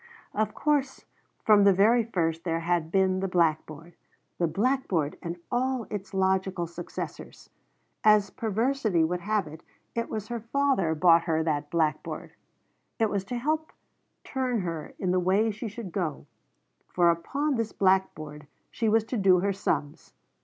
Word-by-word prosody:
Of 215 0 -1
course 285 -3 0 0.4
from 210 -2 +6
the 200 -1 +6
very 225 +5 +4
first 165 -7 -1
there 165 -2 -1
had 170 -1 0
been 190 -1 +2
the 195 - -1
blackboard 165 -2 -1 0.5
the 170 - +2
blackboard 195 - 0
and 170 0 -5
all 255 -1 0
its 200 -2 -5
logical 190 -1 0
successors. 170 +1 -8 0.5
As 210 -2 +5
perversity 220 -4 0
would 175 +2 0
have 210 +1 0
it, 155 +1 -11 0.3
it 230 0 -2
was 215 -1 -5
her 240 -1 -3
father 230 - +1
bought 170 +1 +5
her 160 -2 +1
that 150 -2 -1
blackboard. 155 -3 -2 0.6
It 225 -3 +1
was 200 -2 -1
to 245 +5 -4
help 310 +5 -1 0.5
turn 255 -4 -1
her 165 -4 -5
in 185 -2 -1
the 185 - +2
way 195 +5 +2
she 220 +3 -6
should 210 -2 -7
go, 165 -5 -3 0.6
for 175 -1 +3
upon 275 - -1
this 230 -3 -1
blackboard 155 -6 0 0.2
she 225 -2 0
was 220 0 +3
to 235 +2 -4
do 190 -3 +4
her 200 +1 +1
sums. 155 -5 -3
190 Hz, 155 wpm, -27 LUFS, 170-225 Hz, 0.6 s, from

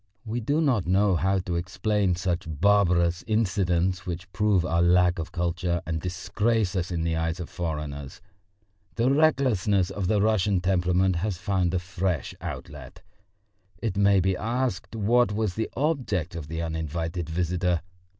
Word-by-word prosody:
We 115 +2 -2
do 145 +7 0
not 125 - +1
know 95 +1 +3
how 95 +3 +1
to 90 -1 -3
explain 95 +2 0
such 90 0 -2
barbarous 85 0 +2
incidents 95 -5 +1
which 90 +2 -6
prove 100 -3 +2
our 85 -1 +1
lack 90 0 +4
of 80 - -5
culture 85 0 -1
and 80 -1 -3
disgrace 100 +3 -1
us 90 -2 -1
in 85 -2 -2
the 85 0 0
eyes 80 +2 -1
of 85 - -6
foreigners. 75 -4 -5 0.8
The 120 +3 +2
recklessness 120 - +2
of 95 -2 -3
the 105 +2 +2
Russian 105 -2 +2
temperament 90 0 +2
has 95 +1 -2
found 95 -1 0
a - - +3
fresh 90 -3 -2
outlet. - - -8 0.7
It 110 -4 -3
may 100 -1 +4
be 95 +1 +1
asked 120 +3 -2
what 115 +2 +3
was 105 -3 -1
the 110 +2 -2
object 125 - -1
of 80 -4 -6
the 80 +1 -4
uninvited 80 +1 -3
visitor? 90 +1 0
90 Hz, 155 wpm, -26 LUFS, 85-105 Hz, 0.8 s, lack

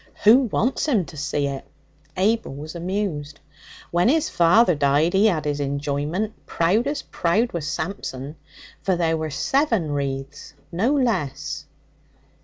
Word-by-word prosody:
'Who 225 +4 +8
wants 260 +5 0
him 220 - +2
to 165 - -12
see 145 0 -1
it?' 140 -1 -4 0.5
Abel 210 -5 +1
was 150 +3 -7
amused. 170 -5 -3 0.5
'When 175 +6 +3
his 315 +2 +2
father 175 +4 +5
died 145 +3 +2
he 205 +3 +5
'ad 160 -6 -1
his 145 -1 -1
enjoyment 145 +8 -2
proud 195 +10 +1
as 290 +1 -2
proud 215 +8 0
was 160 -3 -4
Samson, 155 -4 -4 0.5
for 190 - +1
there 165 -2 +1
were 160 -1 -3
seven 225 - +1
wreaths, 135 -1 -4 0.2
no 205 +10 +1
less.' 225 - -1
170 Hz, 140 wpm, -23 LUFS, 145-215 Hz, 0.5 s, Who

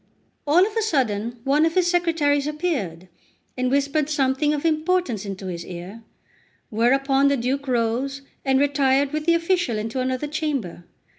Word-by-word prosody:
All 340 +6 +5
of 425 +1 -6
a 450 - +1
sudden, 240 - -1
one 285 +3 +3
of 325 0 +1
his 365 -2 +3
secretaries 325 -5 +1
appeared, 275 - -3 0.5
and 255 0 0
whispered 280 +2 +1
something 280 0 +1
of 300 +1 -2
importance 315 - 0
in 195 -1 -5
his 180 -3 -6
ear; 180 +5 -9 0.7
whereupon 270 +5 +3
the 280 0 +2
Duke 270 +3 -2
rose, 255 +3 -1 0.2
and 265 -1 +2
retired 280 0 +2
with 305 +1 -3
the 335 - +5
official 335 - 0
into 225 +4 -3
another 255 +2 -1
chamber. 290 - -3
275 Hz, 155 wpm, -23 LUFS, 240-305 Hz, 0.7 s, All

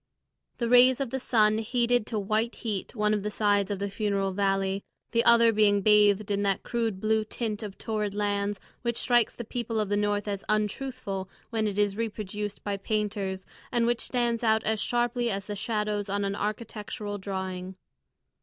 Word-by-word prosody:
The 235 - -1
rays 250 +2 +6
of 270 -4 -2
the 265 - -2
sun 215 -3 +3
heated 240 0 +1
to 225 - -2
white 215 +3 0
heat 215 0 -4
one 210 -1 +2
of 210 - 0
the 210 - -2
sides 205 -2 +1
of 205 - -2
the 200 +1 -2
funeral 200 -1 -1
valley, 195 0 0 0.3
the 230 0 +3
other 235 -1 +6
being 205 -1 +4
bathed 210 -1 +4
in 200 0 +1
that 195 -1 0
crude 225 -5 -2
blue 220 +1 +2
tint 215 -1 -3
of 205 -3 -7
torrid 210 -2 -2
lands 205 -1 -1 0.2
which 235 -1 -1
strikes 240 -2 +2
the 235 - -5
people 230 0 -3
of 210 -2 -1
the 205 - +1
North 205 0 0
as 200 -1 -3
untruthful 210 -2 -2 0.2
when 220 -2 0
it 205 -1 -3
is 205 -1 +2
reproduced 210 -2 -4
by 200 -1 -2
painters, 200 -2 -2 0.3
and 240 -1 +2
which 240 0 +1
stands 240 -2 0
out 220 -1 +3
as 220 -1 0
sharply 240 0 0
as 195 -2 -2
the 205 - -5
shadows 210 -1 -2
on 200 +1 0
an 195 0 -1
architectural 210 -1 -4
drawing. 190 -1 -5
210 Hz, 185 wpm, -28 LUFS, 200-230 Hz, 0.3 s, rays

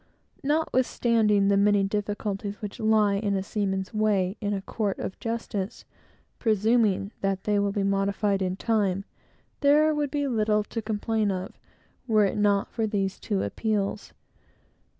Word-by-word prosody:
Notwithstanding 235 -8 +2
the 200 - +4
many 200 0 +4
difficulties 205 0 -3
which 210 -3 -7
lie 215 -2 +3
in 200 -1 0
a 190 - -1
seaman's 190 -1 -2
way 205 -3 +1
in 205 -1 -1
a 195 -1 -2
court 205 -2 -2
of 190 - -5
justice, 225 -4 -4 0.5
presuming 215 -2 +2
that 195 -1 -1
they 210 -1 +1
will 200 0 +1
be 200 -1 -1
modified 195 0 +1
in 185 0 -1
time, 200 -2 0 0.5
there 300 +2 +4
would 295 -1 -1
be 285 0 -1
little 215 -3 +1
to 225 +2 -5
complain 215 0 -1
of, 185 -1 -4 0.5
were 215 -3 +4
it 200 - -1
not 205 -1 +2
for 225 -1 -1
these 195 -2 -2
two 200 -3 -1
appeals. 210 -2 -2
205 Hz, 150 wpm, -26 LUFS, 195-220 Hz, 0.5 s, the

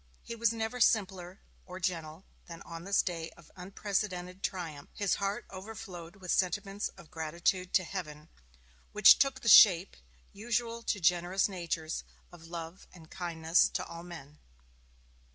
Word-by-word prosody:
He 235 - -7
was 230 -1 +2
never 225 +2 -3
simpler 190 -4 +1 0.2
or 185 0 -9
gentler 170 -2 -3 0.2
than 170 -1 -10
on 165 +1 -9
this 200 0 +2
day 165 -3 -4
of 170 -3 -18
unprecedented 185 -1 -3
triumph; 160 -8 -5
his 200 -2 0
heart 200 +4 -2
overflowed 190 -3 -9
with 185 -3 -5
sentiments 195 +3 0
of 170 -5 -15
gratitude 170 +3 -1
to 185 - +4
Heaven, 155 -5 -7 0.7
which 210 -1 +8
took 270 -1 +1
the - - -6
shape, 195 -4 +8 0.4
usual 230 +2 -2
to 210 - -2
generous 180 +2 +2
natures, 170 -4 -4 0.3
of 165 -2 -14
love 170 +2 -8
and 165 -3 -16
kindness 165 -2 +2
to - - -1
all 170 0 -9
men. 155 -4 -11
180 Hz, 145 wpm, -31 LUFS, 170-200 Hz, 0.7 s, which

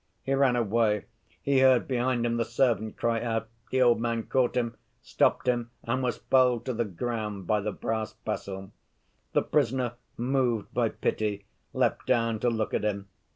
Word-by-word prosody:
He 135 - -1
ran 135 -2 +3
away; 110 -2 +1 0.4
he 140 -1 +3
heard 130 -2 +5
behind 125 -1 0
him 120 0 0
the 115 - +2
servant 115 -2 0
cry 115 -1 0
out; 115 -1 -2 0.2
the 130 0 +3
old 120 -2 +4
man 115 -1 -1
caught 125 0 +1
him, 115 -2 -1 0.2
stopped - - +1
him 120 -1 +1
and 130 +3 -1
was 125 -2 -1
felled 125 -3 +3
to 130 - -1
the 120 0 0
ground 105 -1 -4
by 105 +3 +1
the 105 +1 -2
brass 110 +1 -3
pestle. 95 -3 -5 0.6
"The - - +3
prisoner, 130 -3 +1 0.2
moved 120 -3 0
by - - +2
pity, 105 -2 -2 0.3
leapt - - 0
down 115 -3 +2
to 120 - +2
look 110 -2 -2
at - - 0
him. 100 -2 -2
115 Hz, 175 wpm, -28 LUFS, 110-125 Hz, 0.6 s, heard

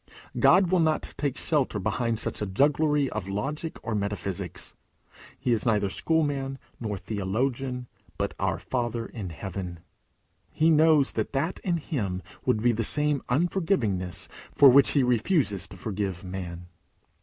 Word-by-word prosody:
God 185 -1 +5
will 185 - +4
not 160 -1 +1
take 140 -3 -2
shelter 140 -8 0
behind 110 +3 -1
such - - -4
a 105 - -1
jugglery 145 +6 +2
of 100 -3 -4
logic 150 +11 -3
or 115 - -2
metaphysics. 100 -3 -3 0.6
He 125 - -1
is 115 -2 +2
neither 105 -4 +2
schoolman 140 -3 0 0.2
nor 105 -4 -3
theologian, 120 +7 -2 0.3
but 100 0 -1
our 95 -3 0
Father 120 +1 -2
in 105 -6 -6
heaven. 90 0 -6 0.7
He 160 +1 +3
knows 155 -2 +5
that 110 +3 -3
that 150 +7 -1
in 175 -3 0
him 100 - -3 0.2
would 115 -4 +2
be 120 - +5
the 115 0 -1
same 150 +3 +1
unforgivingness 125 - 0 0.3
for 140 - +9
which 135 +2 +6
he 140 - +4
refuses 125 - +1
to 95 - -12
forgive 95 -2 -3
man. 90 -2 -6
120 Hz, 145 wpm, -27 LUFS, 100-145 Hz, 0.7 s, for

